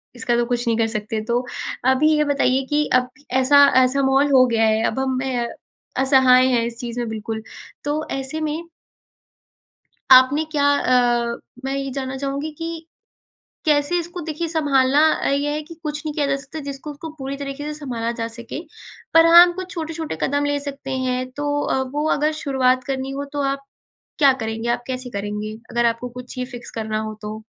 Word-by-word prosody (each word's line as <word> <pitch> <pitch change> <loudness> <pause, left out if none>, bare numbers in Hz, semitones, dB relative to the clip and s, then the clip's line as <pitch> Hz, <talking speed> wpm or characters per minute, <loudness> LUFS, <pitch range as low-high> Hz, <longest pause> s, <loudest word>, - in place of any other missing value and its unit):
इसका 240 0 0
तो 240 - +2
कुछ 240 0 -2
नहीं 230 -1 +2
कर 225 -1 +2
सकते। 215 0 -3
तो, 245 +2 0 0.4
अभी 265 +4 +4
ये 300 - +3
बताइए 270 -2 +1
कि 295 0 +2
अब 250 0 +3 0.2
ऐसा 265 +2 +6 0.2
ऐसा 265 +2 +1
माहोल 270 +2 +3
हो 255 -1 +7
गया 225 -2 +2
है 220 +1 +2
अब 265 - -2
हम 260 -1 0
अ, 245 -3 -1 0.5
असहाय 260 -1 +5
हैं 245 -3 +2
इस 235 0 -6
चीज़ 240 0 -5
में 240 - -2
बिल्कुल। 220 0 -5 0.4
तो 295 +2 -1 0.2
ऐसे 270 +4 -5
में 310 +2 -2 1.5
आपने 260 +4 +7
क्या 285 -2 +1
अ 240 -2 +2 0.3
मैं 270 - -1
ये 275 0 -3
जानना 265 0 -4
चाहूँगी 280 +3 -3
कि 330 0 -6 0.8
कैसे 300 +2 +2
इसको 345 +1 -5
देखिए 320 +1 -4
संभालना 285 -3 +3
अ, - - -2
ये 285 +1 0
है 305 +1 -2
कि 330 +2 -11
कुछ 300 0 -4
नहीं 300 - -2
किया 290 -2 0
जा 275 - +1
सकता 280 +3 -9
जिसको 280 +2 -6
उसको 295 +3 -8
पूरी 270 +1 -4
तरीके 280 +1 -6
से 300 0 -4
संभाला 235 -5 -3
जा 230 - -1
सके। 235 +5 -8 0.5
पर 330 0 +7
हाँ, 340 +1 +10
हम 350 0 +4
कुछ 370 +1 -7
छोटे-छोटे 320 - -4
कदम 285 +1 +1
ले 290 0 0
सकते 275 -1 -7
हैं। 255 -1 -2
तो 290 +1 -2
अ, 265 - 0
वो 290 +4 -3
अगर 305 +2 +1
शुरुआत 255 -2 +2
करनी 265 0 -3
हो 280 +1 -4
तो 290 - -2
आप 275 0 -7 0.5
क्या 280 -3 +6
करेंगे? 225 +1 -3
आप 240 - -1
कैसे 255 -1 -5
करेंगे 210 +1 -4 0.2
अगर 240 0 +2
आपको 230 +2 -1
कुछ 250 - -11
ही 250 - -1
फिक्स 240 - -8
करना 215 0 -2
हो 215 0 -5
तो? 215 +1 -6
265 Hz, 195 wpm, -21 LUFS, 240-290 Hz, 1.5 s, हाँ